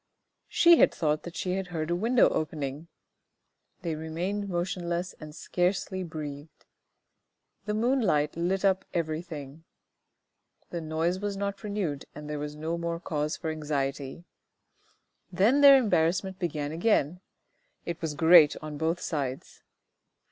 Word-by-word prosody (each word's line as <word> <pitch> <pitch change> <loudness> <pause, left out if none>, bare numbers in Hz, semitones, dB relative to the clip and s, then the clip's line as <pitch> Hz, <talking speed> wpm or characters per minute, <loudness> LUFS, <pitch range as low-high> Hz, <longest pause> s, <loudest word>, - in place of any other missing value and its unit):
She 340 0 +6
had - - +6
thought 150 -1 0
that 175 - -9
she 180 - -2
had 190 -1 -3
heard 165 -2 -3
a - - +2
window 230 +6 +4
opening. 150 0 -3 1.0
They 165 -2 -1
remained 175 +6 -3
motionless 175 0 -2
and 155 -1 -10
scarcely 185 +2 -1
breathed. 150 -3 -8 1.0
The 210 0 -1
moonlight 215 - +1
lit 185 +4 0
up 190 -1 +3
everything. 155 -3 -4 1.1
The 170 - -3
noise 160 +3 -1
was 205 0 -3
not 200 0 -3
renewed 195 -9 -3
and 150 0 -8
there 150 -1 -4
was 150 0 -5
no 160 +3 -3
more 170 0 -3
cause 150 -2 -2
for 160 -2 -3
anxiety. 140 -1 -3 1.1
Then 215 +10 +3
their 280 -1 +10
embarrassment 190 -4 +1
began 150 -4 -2
again; 175 -1 +1 0.6
it 170 -1 -5
was 160 -3 -3
great 160 -1 +7
on 150 -1 -7
both 165 +2 0
sides. 140 -7 -4
170 Hz, 135 wpm, -28 LUFS, 150-190 Hz, 1.1 s, their